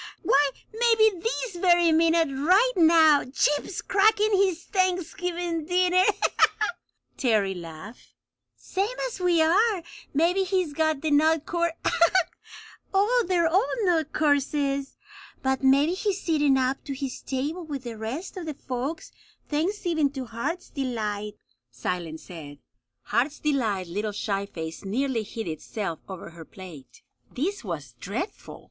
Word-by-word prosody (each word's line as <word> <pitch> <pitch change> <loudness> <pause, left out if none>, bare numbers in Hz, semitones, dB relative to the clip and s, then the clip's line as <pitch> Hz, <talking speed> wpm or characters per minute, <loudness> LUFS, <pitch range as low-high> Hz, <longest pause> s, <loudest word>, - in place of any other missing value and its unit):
"Why, 285 +1 +4 0.2
maybe 440 -4 +3
this 460 -3 -3
very 345 -2 +4
minute 325 0 +3
right 365 - +3
now 320 -3 +6
Chip's 295 +7 0
cracking 425 +2 +3
his 375 -3 +1
Thanksgiving 355 -3 -1
dinner!" 365 +1 +3 1.1
Terry 215 -6 +2
laughed. 175 +5 -11 0.4
"Same 415 +6 -3
as 480 - -8
we 350 -3 +3
are! 385 +3 +3 0.3
Maybe 345 +6 +2
he's 370 -5 0
got 315 +1 +2
to - - -13
the 310 -1 -1
nut 315 +1 +3
cour 340 -1 0 1.2
oh, 435 +5 +3
they're 350 -2 +2
all 380 +8 +2
nut 325 -5 +1
courses! 280 -2 0 0.5
But 265 0 0
maybe 280 +5 +4
he's 395 +1 -1
sittin' 295 -6 +2
up 260 +1 0
to 280 - -4
his 270 -2 -5
table 290 +7 -3
with 285 -5 -6
the 235 -2 -6
rest 255 - -5
of 345 -3 -6
the 305 - -4
folks, 265 +5 -5 0.4
thanksgiving 325 -1 0
to 265 -2 -5
Heart's 245 +11 -4
Delight," 210 -6 -3 0.3
Silence 160 +6 -4
said. 150 -5 -10 0.5
Heart's 285 +5 0
Delight's 225 - 0
little 210 +3 -2
shy 200 -1 -2
face 160 -3 -7
nearly 240 +4 -1
hid 220 0 -6
itself 165 +2 -4
over 185 -3 -8
her 165 -1 -11
plate. 160 -8 -13 0.3
This 370 +8 -3
was 150 - -6
dreadful! 230 - -5
300 Hz, 135 wpm, -26 LUFS, 230-360 Hz, 1.2 s, now